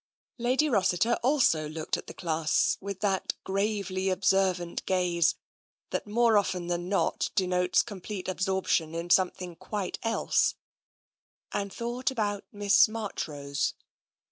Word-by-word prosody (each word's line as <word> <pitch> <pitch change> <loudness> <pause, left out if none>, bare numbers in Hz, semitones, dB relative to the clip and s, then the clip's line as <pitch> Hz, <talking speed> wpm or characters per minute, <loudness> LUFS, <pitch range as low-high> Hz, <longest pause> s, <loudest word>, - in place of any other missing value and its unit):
Lady 255 +6 +2
Rossiter 200 - +2
also 240 - +2
looked 155 0 -2
at - - -7
the - - -8
class 160 -3 +1
with 200 -1 -6
that 195 -3 0
gravely 195 -1 -1
observant 185 -2 +1
gaze 175 -3 +2 0.6
that, - - -2
more 225 0 +4
often 180 -3 -2
than 175 +1 -2
not, 200 - +1
de 190 - +2
notes 180 0 +2
complete 200 -2 -7
absorption 185 -4 0
in 170 +1 -4
something 180 -1 +2
quite 185 +2 -4
else, 225 0 +1 1.0
and 200 -1 -2
thought 240 +5 -2
about 205 -5 -2
Miss 205 +1 +5
Marchrose. 155 -10 -3
190 Hz, 125 wpm, -28 LUFS, 175-210 Hz, 1.0 s, Miss